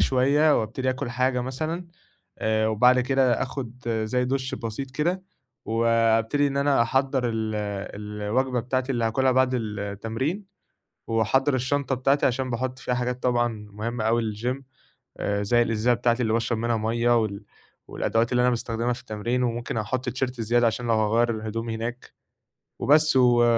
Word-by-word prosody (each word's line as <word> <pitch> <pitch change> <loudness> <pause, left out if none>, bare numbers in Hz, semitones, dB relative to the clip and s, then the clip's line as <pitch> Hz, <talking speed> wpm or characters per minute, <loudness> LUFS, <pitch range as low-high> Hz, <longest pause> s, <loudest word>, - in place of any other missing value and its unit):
شوية، 140 +3 +3
وأبتدي 130 +4 -2
آكُل 130 -1 -4
حاجة 125 0 +1
مثلًا، 155 +8 -3 0.5
آآ 110 0 +1
وبعد 125 +4 +4
كده 130 -1 +2
آخد 125 -2 -6 0.2
زي 125 +3 0
دُش 130 0 -2
بسيط 120 +4 -5
كده، 170 +7 -1 0.4
وأبتدي 115 +4 +2
إن 140 0 -2
أنا 140 -3 +3
أحضّر 130 +1 0
ال 110 -1 -2 0.4
الوجبة 105 +5 -1
بتاعتي 130 +2 -1
اللي 120 -2 0
هاكلها 130 +3 +2
بعد 130 0 +3
التمرين، 110 - -3 0.6
وأحضّر 130 +5 +2
الشنطة 135 +1 0
بتاعتي 135 +3 +2
عشان 130 0 0
باحط 130 +2 -3
فيها 125 - -2
حاجات 125 0 -3
طبعًا 120 -4 0
مهمة 110 +2 -4
أوي 115 -1 +1
للGym 125 +5 -3 0.6
آآ 100 0 -1
زي 120 +3 +3
الإزازة 115 +1 +2
بتاعتي 120 +1 +1
اللي 110 -1 +1
باشرب 115 0 0
منها 115 0 0
مَيّة، 115 +2 +2
وال 100 -1 -4 0.4
والأدوات 115 +1 0
اللي 125 - +3
أنا 125 - +4
باستخدمها 115 0 -1
في 120 - -8
التمرين، 120 +2 -2
وممكن 120 -1 -2
أحط 120 +4 -2
تيشيرت 125 -2 -3
زيادة 120 +2 +3
عشان 120 +2 -2
لو 115 - +3
هاغيّر 110 +2 +2
الهُدوم 110 +1 -4
هناك، 115 +2 -5 0.7
وبس 150 +2 +4
و 120 -2 +5
120 Hz, 155 wpm, -25 LUFS, 115-130 Hz, 0.7 s, و